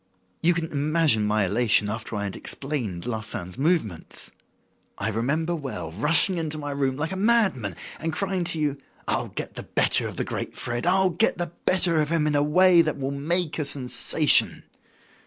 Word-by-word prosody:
You 170 +1 +2
can 165 -1 -4
imagine 145 -6 +1
my 105 -1 +1
elation 105 +1 +2
after 110 +1 -5
I 100 - -3
had 100 -2 -5
explained 120 - -5
Larsan's 110 -6 -4
movements. 135 - -2 0.7
I 100 - -2
remember 145 +10 -2
well 135 - -6
rushing 165 - +2
into 155 -1 -4
my 145 -1 -6
room 135 -2 -2
like 160 +4 -3
a - - -3
mad 215 - +3
man 100 -8 -6 0.2
and 165 +1 -3
crying 190 0 -2
to 165 - 0
you: 145 -2 -2 0.3
'I'll - - -1
get - - -7
the - - -7
better - - +1
of - - -8
the - - -2
great - - -6
Fred. 120 +3 -3
I'll 190 +1 +3
get 195 +4 0
the 175 -2 -4 0.2
better 175 -4 +3
of 150 - -2
him 165 -2 0
in 150 - 0
a 145 - +2
way 175 +4 +4
that 155 -3 -2
will 135 0 -4
make 160 +4 -2
a - - 0
sensation! 135 -3 +5
150 Hz, 190 wpm, -24 LUFS, 120-170 Hz, 0.7 s, sensation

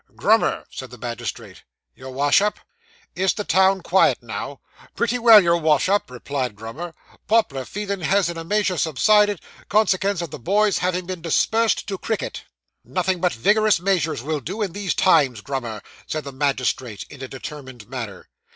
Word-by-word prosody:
'Grummer,' - - +2
said - - -8
the - - -12
magistrate. - - -6 0.3
'Your 130 0 -10
Wash 140 +6 +3
up.' 210 0 0 0.6
'Is 190 +1 +1
the 210 - -3
town 190 0 +3
quiet 170 -9 +3
now?' 120 +5 -6 0.4
'Pretty 235 +1 0
well, 230 -2 +9
your 170 -3 +3
Wash 155 -2 +2
up,' 205 +2 +1
replied 125 -1 -4
Grummer. 140 +11 -8 0.3
'Pop'lar 140 - +1
feeling 200 -2 -4
has 195 +2 +2
in 170 - -4
a 165 - -6
measure 190 0 0
subsided, 205 +6 +3 0.3
consekens 200 -3 +2
o' - - -2
the 150 - -9
boys 205 - +2
having 180 0 -1
dispersed 185 +6 +1
to 195 -2 -5
cricket.' 220 - -4 0.4
'Nothing 185 -1 -1
but 180 -1 +2
vigorous 210 - +3
measures 170 -8 0
will 155 +1 -2
do 190 - -4
in 195 - -3
these 200 -1 -2
times, 135 - +3
Grummer,' 120 -5 -5 0.2
said 155 -1 -3
the 140 - -7
magistrate, 130 -6 -2
in 140 - -11
a 130 - -5
determined 130 -4 -9
manner. 115 -8 -7
170 Hz, 165 wpm, -22 LUFS, 135-200 Hz, 0.6 s, well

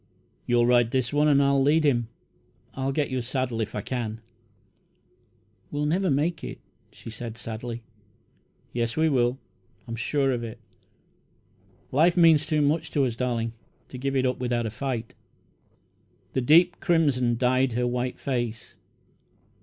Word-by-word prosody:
"You'll 120 0 +3
ride 120 -1 +4
this 130 +1 -1
one, 150 +1 +3
and 140 -1 +4
I'll 140 0 +3
lead 150 +4 +3
him. 120 -6 +2 0.7
I'll 135 0 -2
get 145 0 -1
your 130 -1 -1
saddle 125 -1 -2
if 110 - -4
I 105 - -2
can." 115 -2 -4 1.5
"We'll 145 0 -2
never 180 +5 +1
make 150 +3 0
it," - - -6 0.3
she 115 - -10
said 115 0 -7
sadly. 115 +1 -6 0.9
"Yes, 115 +1 -2
we 160 0 +3
will 125 -2 +1 0.5
I'm 115 - -4
sure 135 +4 0
of 120 -2 -2
it. 115 +1 -7 1.3
Life 165 +6 +3
means 160 -3 +5
too 155 -2 +2
much 155 +2 +1
to 140 -2 +3
us, 120 -3 -2
darling, 115 -2 -2 0.4
to 130 - -8
give 135 +1 -2
it 130 -1 +2
up 125 -1 0
without 120 -2 -1
a 110 - -3
fight." 120 -2 -4 1.2
The 130 - +1
deep 170 +7 +5
crimson 140 -9 +2
dyed 130 +1 +2
her 125 +1 0
white 125 +1 -2
face. 120 -4 -3
130 Hz, 155 wpm, -26 LUFS, 120-145 Hz, 1.5 s, means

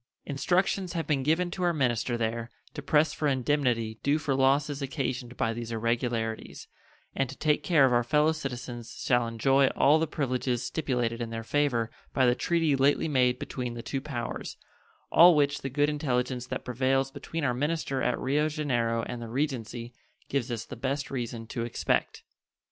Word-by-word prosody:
Instructions 180 +5 0
have 165 -2 -2
been 145 -3 +1
given 165 +5 +1
to 185 - -5
our 175 -1 +2
minister 120 -4 0
there 115 +1 -2 0.2
to 150 - -6
press 150 +2 +3
for 150 - -1
indemnity 125 -5 0
due 145 +2 +2
for 155 -3 -1
losses 140 +2 +2
occasioned 130 -3 -3
by 115 - 0
these 115 0 -6
irregularities, 115 0 -2 0.5
and 135 -2 -1
to 135 - -9
take 150 -1 +2
care 155 -4 +4
of 130 - +2
our 120 0 +3
fellow 150 +6 +3
citizens 125 -6 -6
shall 120 -2 +3
enjoy 135 +4 +3
all 150 +3 +5
the 160 - 0
privileges 125 -4 -1
stipulated 125 -6 -1
in 115 - -3
their 115 0 -5
favor 120 -3 0 0.2
by 130 - +4
the 120 - +5
treaty 165 +2 +1
lately 140 +4 +3
made 125 -4 +2
between 125 -3 -5
the 115 - -6
two 135 - -3
powers, 130 -5 -5 0.5
all 175 0 +8
which 145 -1 +2
the 135 - -3
good 145 +2 +2
intelligence 125 -4 -1
that 130 - -5
prevails 135 +2 +1
between 150 +3 -5
our 125 -4 +2
minister 145 0 -1
at 125 - +1
Rio 150 +4 +1
Janeiro 120 -7 0
and 120 +1 -5
the 115 - -6
Regency 120 -3 -3 0.4
gives 135 -3 -1
us 115 -2 -3
the - - -8
best 140 +1 -3
reason 120 -3 -4
to 115 +1 -4
expect. 120 - -1
130 Hz, 180 wpm, -28 LUFS, 120-145 Hz, 0.5 s, all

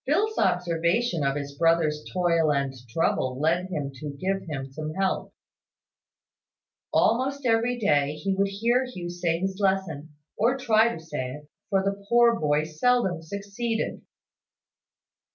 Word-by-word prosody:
Phil's 420 +10 +1
observation 170 +2 +1
of 135 0 +1
his 140 -1 -5
brother's 160 -1 +2
toil 170 -4 +2
and 140 -2 0 0.2
trouble 130 -2 0
led 170 +4 +1
him 145 -7 -3
to 140 +1 -7
give 195 +2 -1
him 135 -3 -4
some 155 +2 -5
help. 195 0 -1 1.6
Almost 265 +4 +2
every 235 +1 +2
day 145 -9 +2
he 195 +5 -1
would 195 +1 +1
hear 230 +6 +1
Hugh 180 -9 -6
say 175 -1 0
his 190 +2 -3
lesson 180 -7 -1 0.2
or 240 +5 +2
try 230 -3 +3
to 165 - -6
say 150 -6 -4
it; 150 0 -13 0.2
for 195 -1 +2
the 200 0 -2
poor 235 -1 +5
boy 150 0 +2
seldom 175 +2 +1
succeeded. 200 +6 -3
180 Hz, 140 wpm, -26 LUFS, 155-225 Hz, 1.6 s, poor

